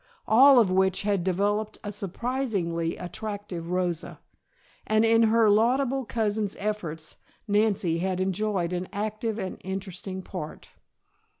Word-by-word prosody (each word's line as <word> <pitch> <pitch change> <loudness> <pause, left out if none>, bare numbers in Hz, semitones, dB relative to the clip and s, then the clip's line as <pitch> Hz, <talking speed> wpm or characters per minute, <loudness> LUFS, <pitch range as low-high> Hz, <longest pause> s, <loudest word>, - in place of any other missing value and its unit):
All 265 +5 +7
of 220 -6 +5
which 190 +1 +2
had 200 -3 +1
developed 205 +4 0
a 205 - -4
surprisingly 200 -5 -2
attractive 180 -1 -6
Rosa, 180 -2 -2 0.7
and 215 +1 +3
in 225 0 +5
her 225 0 +4
laudable 255 +5 +2
cousin's 215 -3 -1
efforts 170 -7 -4 0.3
Nancy 205 -5 +2
had 185 +1 -1
enjoyed 190 -2 -1
an 180 +1 -3
active 215 +1 -3
and 190 -4 -5
interesting 190 0 -5
part. 155 -6 -7
205 Hz, 120 wpm, -27 LUFS, 180-215 Hz, 0.7 s, All